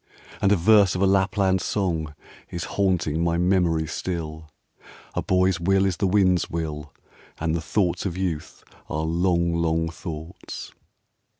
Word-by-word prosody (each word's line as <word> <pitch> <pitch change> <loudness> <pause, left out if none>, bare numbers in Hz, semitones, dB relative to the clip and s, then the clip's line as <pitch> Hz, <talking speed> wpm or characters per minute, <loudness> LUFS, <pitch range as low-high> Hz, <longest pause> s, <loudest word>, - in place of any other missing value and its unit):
And 100 - +3
a - - +6
verse 100 +1 +5
of 90 - -2
a - - +5
Lapland 95 -1 +2
song 80 -7 -2 0.3
Is 85 -2 -4
haunting 85 -5 0
my 85 0 +1
memory 90 -3 +2
still: 80 -1 -5 0.6
"A - - -1
boy's 95 -1 +2
will 95 +3 +2
is 95 -2 0
the 100 - +1
wind's 90 -2 +3
will, 75 -2 -4 0.5
And 80 0 0
the 85 - -1
thoughts 90 +1 0
of 90 -1 -5
youth, 85 -5 -4 0.3
are 80 +1 -2
long, 85 +1 +1
long 80 -1 0
thoughts.' 80 +1 -8
85 Hz, 145 wpm, -24 LUFS, 80-95 Hz, 0.6 s, a